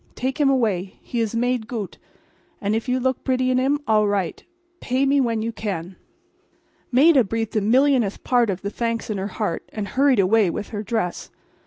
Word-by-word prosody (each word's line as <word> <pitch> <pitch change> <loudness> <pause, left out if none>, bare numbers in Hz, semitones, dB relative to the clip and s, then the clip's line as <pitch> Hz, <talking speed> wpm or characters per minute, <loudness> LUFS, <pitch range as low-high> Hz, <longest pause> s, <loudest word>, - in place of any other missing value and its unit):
Take 260 +4 -3
him 280 - +4
away. 210 -8 0
He 240 - -4
is 225 -1 -1
made 245 -1 0
goot; 225 -6 -5 0.6
and 210 -1 -1
if 225 +3 -3
you 255 +1 +1
look 260 0 -1
bretty 255 -1 +1
in 255 - +2
him 275 +3 +2
all 215 -1 +3
right. 200 -3 -1
So. - - -26 0.3
Pay 260 +2 0
me 275 0 +3
when 230 -3 0
you 230 - -2
can." 190 -5 -5 1.0
Maida 275 +1 +6
breathed 225 +2 -3
a 215 - +2
millionth 245 -1 +2
part 245 -3 +2
of 195 0 -3
the 200 - -3
thanks 230 0 -2
in 205 - -2
her 195 - -2
heart, 205 -4 -4
and 205 -2 -5
hurried 270 +3 +3
away 200 +1 +4
with 200 - -5
her 210 -2 -4
dress. 215 -4 -3
230 Hz, 200 wpm, -22 LUFS, 205-255 Hz, 1.0 s, Maida